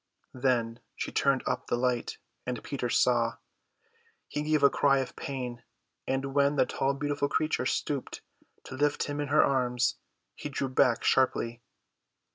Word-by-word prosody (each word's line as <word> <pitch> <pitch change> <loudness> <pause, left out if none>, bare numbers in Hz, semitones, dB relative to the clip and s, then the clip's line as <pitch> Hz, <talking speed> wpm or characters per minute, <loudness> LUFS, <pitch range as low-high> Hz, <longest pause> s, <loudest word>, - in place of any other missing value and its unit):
Then 120 -3 0 0.2
she - - -4
turned 140 -2 +2
up - - -2
the - - +1
light, 125 -1 -1 0.3
and 125 -2 -4
Peter 130 -3 -3
saw. 120 -1 +2 0.9
He 150 - -3
gave 150 -1 +1
a 140 - +8
cry 140 -1 +3
of 130 -2 -3
pain; 125 -3 -5 0.5
and 135 +1 -1
when 140 +1 +3
the - - +4
tall 135 +1 -1
beautiful 145 0 -1
creature 155 -5 0
stooped 140 -1 -2 0.4
to - - -9
lift 145 +2 +1
him 145 0 -4
in 145 - -2
her 150 +3 +5
arms 125 -2 +1 0.4
he 145 - -6
drew 135 -1 -2
back 125 -2 +3
sharply. 120 -2 +1
135 Hz, 155 wpm, -29 LUFS, 125-140 Hz, 0.9 s, a